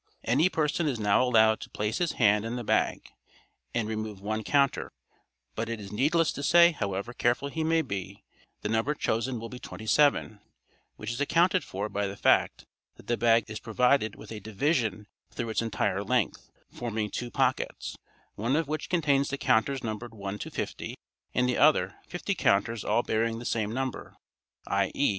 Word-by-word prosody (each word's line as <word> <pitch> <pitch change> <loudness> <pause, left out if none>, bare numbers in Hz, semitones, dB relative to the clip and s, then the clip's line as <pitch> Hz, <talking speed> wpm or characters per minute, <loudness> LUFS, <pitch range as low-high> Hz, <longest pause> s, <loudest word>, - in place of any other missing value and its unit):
Any 145 +10 +3
person 160 0 0
is 130 -6 -1
now 105 +1 +3
allowed 110 -3 +4
to - - -9
place 105 +1 -2
his 175 -2 0
hand 105 -2 +3
in 115 +2 -3
the 120 - -4
bag - - 0 0.6
and 115 -2 -1
remove 110 -2 -4
one 110 +2 -3
counter, 140 +1 +1 0.6
but 115 +1 -3
it 115 -1 -3
is 100 -1 -9
needless 150 +9 +2
to - - -6
say, 170 +4 +6
however 100 - -3
careful 120 +4 0
he 160 +2 -2
may 160 0 +2
be, 100 - -6 0.4
the 105 - -1
number 115 +7 +1
chosen 120 -1 -1
will 115 - -6
be 125 +2 -9
27, 110 -1 +1 0.6
which 110 +2 -5
is 120 +4 -4
accounted 175 +4 +3
for 100 -1 -4
by 100 -1 -2
the 100 +1 -7
fact - - +2 0.3
that - - -16
the 120 - +1
bag 115 -1 +3
is 110 0 -6
provided 120 0 +2
with 110 - -12
a 110 - -5
division 110 - -1 0.2
through 115 -1 -4
its 110 - 0
entire 100 -3 -1
length, 120 -2 -1 0.2
forming 110 -3 -3
two 120 - -4
pockets, 130 0 -1 0.4
one 115 +6 0
of 160 -1 +1
which 155 0 -3
contains 145 -5 +2
the 140 - -2
counters 130 +3 +1
numbered 115 +1 -5
1 100 0 -5
to - - -5
50, - - -5 0.4
and 125 0 +3
the 125 - 0
other, 155 +1 +4
fifty 180 +3 -2
counters 110 - +1
all 120 - +1
bearing 115 +1 0
the 120 - -8
same 110 -3 -1
number, 130 +1 -4 0.5
i.e. 140 - +1
115 Hz, 180 wpm, -28 LUFS, 110-140 Hz, 0.6 s, say